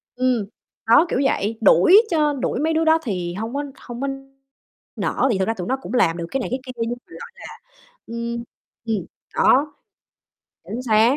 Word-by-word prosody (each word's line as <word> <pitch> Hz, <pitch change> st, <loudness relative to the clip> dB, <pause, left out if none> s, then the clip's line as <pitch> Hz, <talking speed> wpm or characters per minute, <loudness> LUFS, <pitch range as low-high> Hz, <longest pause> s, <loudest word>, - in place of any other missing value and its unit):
Ừm, 250 Hz, -4 st, +1 dB, 0.4 s
đó, 235 Hz, +9 st, +6 dB
kiểu -, -, 0 dB
vậy, 225 Hz, -4 st, 0 dB
đuổi 225 Hz, -, +7 dB
cho 300 Hz, -3 st, +2 dB
đuổi 275 Hz, -, -2 dB
mấy 320 Hz, +3 st, +1 dB
đứa 320 Hz, 0 st, +1 dB
đó 320 Hz, 0 st, +5 dB
thì 180 Hz, -7 st, -3 dB
hông 225 Hz, +6 st, -5 dB
có 285 Hz, -, -1 dB, 0.2 s
hông 240 Hz, 0 st, -8 dB
có 275 Hz, -, -1 dB, 0.9 s
nỡ 260 Hz, -, 0 dB
thì 205 Hz, -, +1 dB
thực 190 Hz, -, +1 dB
ra 225 Hz, -, +1 dB
tụi 180 Hz, -5 st, -6 dB
nó 265 Hz, -, 0 dB
cũng -, -, -7 dB
làm 170 Hz, -9 st, +3 dB
được 170 Hz, -, -4 dB
cái 270 Hz, -, 0 dB
này -, -, -3 dB
cái 255 Hz, -, -1 dB
kia 255 Hz, -, -6 dB
nhưng 230 Hz, 0 st, -1 dB, 0.2 s
mà, -, -, -27 dB
gọi -, -, -10 dB
là, 475 Hz, +1 st, -11 dB, 0.7 s
ưm 235 Hz, 0 st, -4 dB, 0.4 s
ừm, 210 Hz, -6 st, -1 dB, 0.3 s
đó, 290 Hz, +3 st, +4 dB, 0.9 s
chính 240 Hz, +3 st, -5 dB
xác. 230 Hz, +3 st, +4 dB
240 Hz, 200 wpm, -22 LUFS, 220-275 Hz, 0.9 s, đuổi